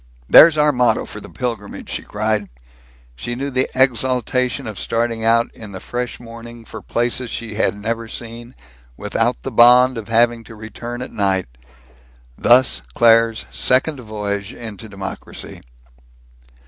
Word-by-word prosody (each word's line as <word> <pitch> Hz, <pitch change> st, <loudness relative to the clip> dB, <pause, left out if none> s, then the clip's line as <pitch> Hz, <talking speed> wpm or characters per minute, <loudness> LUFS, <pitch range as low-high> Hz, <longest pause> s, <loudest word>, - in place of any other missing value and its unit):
"There's 155 Hz, -, +8 dB
our 150 Hz, 0 st, +4 dB
motto 125 Hz, -4 st, +2 dB
for 105 Hz, -, -9 dB
the -, -, -11 dB
pilgrimage!" 115 Hz, -5 st, -5 dB
she -, -, -3 dB
cried. 105 Hz, -1 st, -2 dB, 0.7 s
She 120 Hz, -, -5 dB
knew 140 Hz, +3 st, -4 dB
the 130 Hz, 0 st, 0 dB
exaltation 125 Hz, -1 st, +1 dB
of 110 Hz, -3 st, -6 dB
starting 115 Hz, -1 st, -1 dB
out 115 Hz, +1 st, +3 dB
in 105 Hz, -3 st, -11 dB
the 95 Hz, -, -6 dB
fresh 125 Hz, +3 st, -5 dB
morning 115 Hz, 0 st, -11 dB
for -, -, -9 dB
places 120 Hz, +1 st, -2 dB
she 115 Hz, -1 st, -5 dB
had 105 Hz, 0 st, 0 dB
never 115 Hz, +2 st, -3 dB
seen, 120 Hz, +2 st, -9 dB, 0.4 s
without -, -, -1 dB
the -, -, -4 dB
bond 125 Hz, +1 st, +6 dB
of 110 Hz, -, -9 dB
having 115 Hz, 0 st, +2 dB
to 115 Hz, -, -12 dB
return 120 Hz, +3 st, -7 dB
at -, -, -9 dB
night. 95 Hz, -2 st, 0 dB, 0.9 s
Thus 125 Hz, -, +4 dB
Claire's 115 Hz, -, +4 dB
second 130 Hz, -, +1 dB
voyage 105 Hz, -2 st, -4 dB
into 110 Hz, -1 st, -9 dB
democracy. 95 Hz, -1 st, -8 dB
115 Hz, 145 wpm, -19 LUFS, 110-125 Hz, 0.9 s, There's